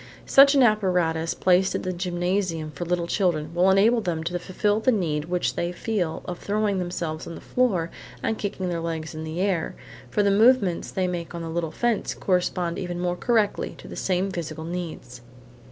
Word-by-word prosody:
Such 275 Hz, +1 st, +7 dB
an 270 Hz, -, +6 dB
apparatus 180 Hz, -7 st, +2 dB
placed 185 Hz, +1 st, +3 dB
in -, -, -2 dB
the 185 Hz, -, -2 dB
gymnasium 175 Hz, -2 st, -1 dB
for 150 Hz, +4 st, -5 dB
little 175 Hz, 0 st, 0 dB
children, 170 Hz, -4 st, 0 dB
will 180 Hz, +2 st, +4 dB
enable 215 Hz, +5 st, +4 dB
them 165 Hz, -5 st, -2 dB
to 175 Hz, +2 st, -2 dB
fulfil 205 Hz, +4 st, 0 dB
the 240 Hz, +4 st, +3 dB
need 160 Hz, -9 st, 0 dB
which 175 Hz, +1 st, -1 dB
they 175 Hz, 0 st, -2 dB
feel 180 Hz, -3 st, -2 dB
of 175 Hz, -1 st, -5 dB
throwing 205 Hz, -1 st, 0 dB
themselves 170 Hz, -3 st, -4 dB
on 165 Hz, -, -6 dB
the -, -, -8 dB
floor 195 Hz, -10 st, 0 dB, 0.3 s
and 220 Hz, -, 0 dB
kicking 195 Hz, -3 st, -3 dB
their 170 Hz, -1 st, -2 dB
legs 165 Hz, -1 st, -4 dB
in 155 Hz, 0 st, -6 dB
the 160 Hz, +2 st, -5 dB
air; 190 Hz, -5 st, 0 dB, 0.3 s
for 210 Hz, -, +1 dB
the 200 Hz, -, +3 dB
movements 210 Hz, -4 st, +4 dB
they 185 Hz, -1 st, -1 dB
make 175 Hz, -1 st, -4 dB
on 170 Hz, -, -5 dB
the 165 Hz, -, -5 dB
little 165 Hz, 0 st, -2 dB
fence 235 Hz, +7 st, -1 dB
correspond 180 Hz, -2 st, 0 dB
even 175 Hz, -2 st, -4 dB
more 175 Hz, 0 st, 0 dB
correctly 220 Hz, +1 st, 0 dB
to -, -, -12 dB
the -, -, -8 dB
same 190 Hz, +1 st, 0 dB
physical 160 Hz, -3 st, -5 dB
needs. 165 Hz, -8 st, -6 dB
180 Hz, 195 wpm, -25 LUFS, 165-200 Hz, 0.3 s, Such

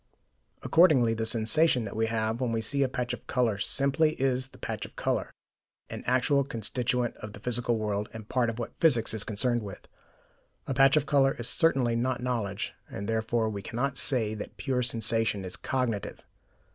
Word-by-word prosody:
Accordingly 145 Hz, -9 st, +4 dB
the 110 Hz, 0 st, -2 dB
sensation 115 Hz, +4 st, +3 dB
that 100 Hz, -, -7 dB
we 110 Hz, 0 st, +1 dB
have 110 Hz, +1 st, -1 dB
when 125 Hz, -2 st, 0 dB
we 115 Hz, -, 0 dB
see 110 Hz, +6 st, 0 dB
a 135 Hz, -, +2 dB
patch 125 Hz, -1 st, -3 dB
of -, -, -9 dB
colour 115 Hz, -6 st, 0 dB
simply 140 Hz, +7 st, +2 dB
is 130 Hz, -1 st, 0 dB
that -, -, -18 dB
patch -, -, -4 dB
of -, -, -10 dB
colour, -, -, -1 dB, 0.6 s
an -, -, -6 dB
actual 130 Hz, +3 st, +2 dB
constituent 120 Hz, 0 st, -2 dB
of 105 Hz, -1 st, -9 dB
the -, -, -10 dB
physical 120 Hz, +1 st, 0 dB
world, 105 Hz, -1 st, -2 dB
and 110 Hz, -2 st, -10 dB
part 120 Hz, -1 st, +1 dB
of 115 Hz, -, -5 dB
what 120 Hz, -, -5 dB
physics 125 Hz, -11 st, +4 dB
is 110 Hz, -1 st, -1 dB
concerned 120 Hz, +3 st, 0 dB
with. 100 Hz, -3 st, -9 dB, 0.8 s
A -, -, -2 dB
patch 135 Hz, +2 st, +5 dB
of 150 Hz, -, +1 dB
colour 140 Hz, -2 st, +3 dB
is 120 Hz, -, -3 dB
certainly 135 Hz, -8 st, +2 dB
not 125 Hz, +2 st, -1 dB
knowledge, 115 Hz, -6 st, -3 dB, 0.2 s
and 100 Hz, +1 st, -6 dB
therefore 110 Hz, 0 st, 0 dB
we 100 Hz, -2 st, -4 dB
cannot 125 Hz, +5 st, -3 dB
say 120 Hz, -5 st, +1 dB
that 105 Hz, -, -8 dB
pure 130 Hz, -3 st, -1 dB
sensation 115 Hz, -4 st, +1 dB
is 90 Hz, 0 st, -3 dB
cognitive. 115 Hz, -2 st, -3 dB
120 Hz, 185 wpm, -28 LUFS, 110-130 Hz, 0.8 s, patch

